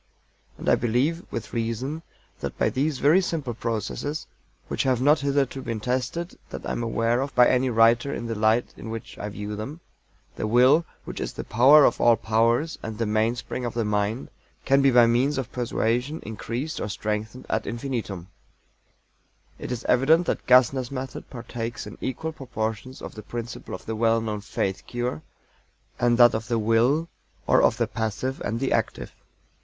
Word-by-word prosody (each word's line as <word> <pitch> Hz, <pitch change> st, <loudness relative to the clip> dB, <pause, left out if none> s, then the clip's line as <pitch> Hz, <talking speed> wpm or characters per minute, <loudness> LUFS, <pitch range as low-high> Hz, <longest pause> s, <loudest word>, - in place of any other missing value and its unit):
And -, -, -8 dB
I -, -, +5 dB
believe, 130 Hz, +9 st, +1 dB
with 115 Hz, -, -5 dB
reason, 120 Hz, +7 st, -2 dB, 0.4 s
that -, -, -5 dB
by -, -, +2 dB
these 140 Hz, +2 st, 0 dB
very 155 Hz, +8 st, +5 dB
simple 155 Hz, -9 st, -3 dB
processes 115 Hz, -, -3 dB, 0.4 s
(which -, -, -1 dB
have 130 Hz, -3 st, +2 dB
not 145 Hz, +4 st, +4 dB
hitherto 140 Hz, -1 st, 0 dB
been 115 Hz, -3 st, -4 dB
tested 130 Hz, -, -3 dB
that -, -, -7 dB
I -, -, -2 dB
am -, -, -2 dB
aware 115 Hz, +1 st, +1 dB
of 140 Hz, +1 st, -4 dB
by 125 Hz, 0 st, +7 dB
any 130 Hz, 0 st, +2 dB
writer 115 Hz, +3 st, +4 dB
in 120 Hz, -, -4 dB
the 115 Hz, -, -2 dB
light 110 Hz, +2 st, +1 dB
in 110 Hz, -, -8 dB
which 115 Hz, 0 st, -7 dB
I 105 Hz, -, -4 dB
view 105 Hz, +1 st, -5 dB
them); 135 Hz, +10 st, -6 dB, 0.6 s
the -, -, -2 dB
Will, 130 Hz, +8 st, +5 dB, 0.2 s
which -, -, -6 dB
is -, -, -4 dB
the -, -, -5 dB
power 135 Hz, +6 st, +6 dB
of 120 Hz, -, +2 dB
all 120 Hz, -1 st, +6 dB
powers 115 Hz, +8 st, +1 dB
and 110 Hz, -1 st, -6 dB
the 115 Hz, -, 0 dB
mainspring 110 Hz, +4 st, -1 dB
of 120 Hz, -1 st, -3 dB
the 115 Hz, -2 st, 0 dB
mind, 105 Hz, +3 st, -1 dB, 0.3 s
can 135 Hz, +1 st, +4 dB
be 135 Hz, -, +5 dB
by 120 Hz, -2 st, +6 dB
means 125 Hz, +5 st, +2 dB
of 130 Hz, -4 st, -3 dB
persuasion 125 Hz, +4 st, -1 dB
increased 120 Hz, +7 st, -4 dB
or 105 Hz, -, -3 dB
strengthened 105 Hz, +3 st, -4 dB
ad 110 Hz, -, -1 dB
infinitum. 115 Hz, -7 st, -4 dB, 1.3 s
It -, -, -6 dB
is 125 Hz, -1 st, -4 dB
evident 155 Hz, +8 st, +4 dB
that -, -, -2 dB
GASSNER'S 125 Hz, 0 st, +4 dB
method 130 Hz, -1 st, -6 dB
partakes 115 Hz, -1 st, -5 dB
in -, -, -10 dB
equal 160 Hz, +5 st, -3 dB
proportions 120 Hz, -3 st, -5 dB
of -, -, -7 dB
the 110 Hz, -, -8 dB
principles 120 Hz, +2 st, -6 dB
of -, -, -22 dB
the 110 Hz, -, -3 dB
well 115 Hz, +1 st, +3 dB
known 105 Hz, -2 st, -3 dB
"Faith 100 Hz, -3 st, -3 dB
Cure," 120 Hz, -9 st, -3 dB, 0.8 s
and 120 Hz, -1 st, +3 dB
that 120 Hz, -1 st, +7 dB
of 110 Hz, +1 st, -3 dB
the 115 Hz, -, 0 dB
Will, 115 Hz, +9 st, +2 dB, 0.4 s
or -, -, +4 dB
of -, -, +3 dB
the -, -, +2 dB
passive 115 Hz, +4 st, -3 dB
and 110 Hz, +3 st, -2 dB
the 135 Hz, -, -1 dB
active. -, -, -2 dB
120 Hz, 180 wpm, -25 LUFS, 110-135 Hz, 1.3 s, by